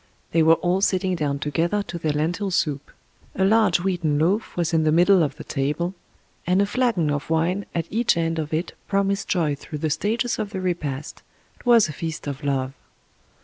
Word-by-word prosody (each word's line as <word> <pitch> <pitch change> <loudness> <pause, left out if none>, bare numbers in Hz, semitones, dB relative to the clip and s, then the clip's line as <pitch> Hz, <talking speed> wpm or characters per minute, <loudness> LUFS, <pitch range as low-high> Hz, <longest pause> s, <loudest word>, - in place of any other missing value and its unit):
They 165 - +3
were 160 +1 +6
all 180 +3 0
sitting 190 -1 +1
down 145 -4 -1
together 165 +8 0
to 170 - -6
their 155 -2 0
lentil 170 +7 -1
soup. 150 -5 -1 0.5
A 190 - +2
large 205 -4 +4
wheaten 175 -5 0
loaf 185 +9 0
was 170 -1 0
in 160 -1 +3
the 155 - +3
middle 180 +3 +5
of 145 -3 0
the 155 - -9
table, 150 +6 -2 0.5
and 180 +2 +3
a 200 - +4
flagon 200 - +1
of 145 +1 -3
wine 170 +5 0
at 165 -2 0
each 225 -4 +2
end 165 -1 0
of 155 -1 -4
it 160 +3 -2
promised 200 0 0
joy 165 -6 +1
through 145 +2 -7
the 155 0 -1
stages 230 +8 -1
of 210 - -2
the 195 -2 -5
repast 155 -7 -3 0.2
— - - -35
'twas 235 -5 +5
a 155 - -6
feast 160 +1 -5
of 140 0 -5
love. 135 -2 -1
170 Hz, 200 wpm, -23 LUFS, 150-195 Hz, 0.5 s, were